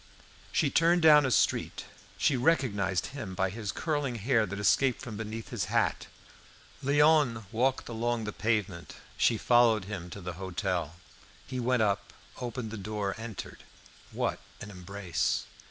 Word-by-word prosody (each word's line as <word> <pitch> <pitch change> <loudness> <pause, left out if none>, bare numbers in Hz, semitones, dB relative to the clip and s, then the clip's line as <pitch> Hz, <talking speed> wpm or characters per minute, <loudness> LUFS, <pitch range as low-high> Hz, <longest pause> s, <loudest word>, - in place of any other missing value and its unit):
She - - +1
turned 170 +1 +3
down 150 -3 +7
a - - 0
street; 120 - +1 0.3
she 140 +6 +2
recognised 105 - +1
him 95 -10 -6
by 95 -1 0
his 105 -1 -4
curling 145 -6 -2
hair 115 0 +1
that 100 +2 -5
escaped 125 +5 +2
from 120 -5 -7
beneath 110 +1 -6
his - - -2
hat. - - 0 0.8
Léon 145 -5 +3
walked 125 +3 0
along 120 0 -1
the 105 -1 -4
pavement. 100 -8 -2 0.2
She 115 - +3
followed 115 -3 +4
him 95 -4 -6
to 100 - -8
the 90 -1 -5
hotel. 90 -3 -2 0.5
He 130 -1 -5
went 125 -1 +2
up, 100 -2 -1 0.3
opened 120 -2 -4
the 115 - -5
door, 100 -1 -3
entered 115 -3 -7 0.5
What - - -1 0.2
an 105 - -8
embrace! 95 -1 -2
110 Hz, 150 wpm, -29 LUFS, 100-125 Hz, 0.8 s, down